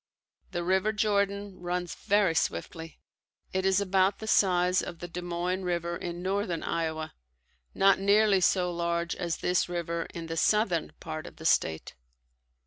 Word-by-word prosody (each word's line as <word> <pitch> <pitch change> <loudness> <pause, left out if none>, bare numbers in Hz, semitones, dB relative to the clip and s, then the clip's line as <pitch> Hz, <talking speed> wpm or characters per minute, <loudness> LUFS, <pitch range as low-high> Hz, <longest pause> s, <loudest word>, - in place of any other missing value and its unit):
The 175 -2 -3
River 190 +4 +2
Jordan 200 -2 0
runs 175 0 -3
very 205 -4 +2
swiftly. 160 - -3 0.5
It 190 0 +1
is 190 0 +3
about 195 0 +2
the 220 - -7
size 180 -3 +3
of 170 - -7
the 175 - -7
Des 175 +1 -6
Moines 175 +2 -2
river 170 -1 -1
in 175 0 -5
northern 190 -3 -1
Iowa, 160 -1 -2 0.6
not 195 0 +4
nearly 200 0 +4
so 180 -1 +2
large 170 0 -1
as 170 -2 -2
this 180 0 +1
river 170 -1 -3
in 170 -1 -6
the 165 0 -5
southern 195 -3 +1
part 155 -1 -6
of - - -12
the 160 - -11
state. 80 - +1
180 Hz, 155 wpm, -28 LUFS, 170-195 Hz, 0.6 s, not